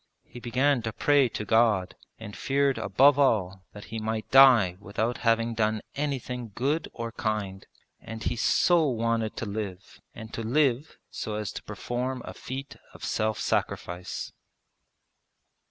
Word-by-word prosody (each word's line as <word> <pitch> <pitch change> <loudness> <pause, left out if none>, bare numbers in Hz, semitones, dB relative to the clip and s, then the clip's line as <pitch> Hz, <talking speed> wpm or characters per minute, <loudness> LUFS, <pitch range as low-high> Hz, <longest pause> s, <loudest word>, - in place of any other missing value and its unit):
He 120 - -12
began 130 +3 +1
to 110 -1 -4
pray 145 -1 +3
to 105 - -5
God, 105 -4 +2 0.2
and 105 -2 -9
feared 140 0 +1
above 140 +1 +4
all 95 -8 +1
that 105 - -10
he 110 - -2
might 110 0 -3
die 125 -9 +7
without 110 +4 -2
having 115 0 +1
done 110 -1 0
anything 125 -5 -3
good 145 +6 0
or 115 -1 -5
kind; 105 -4 -3 0.3
and 115 +1 -8
he 120 - -1
so 165 +7 +3
wanted 115 -2 -1
to - - -3
live, 100 -2 -6
and 110 -1 -10
to - - -4
live 135 +3 +1
so 110 - -4
as 105 -1 -3
to - - -7
perform 125 +1 -4
a - - -7
feat 135 +2 -7 0.2
of - - -8
self 110 0 -1
sacrifice. 90 +1 -3
115 Hz, 150 wpm, -27 LUFS, 110-130 Hz, 0.3 s, die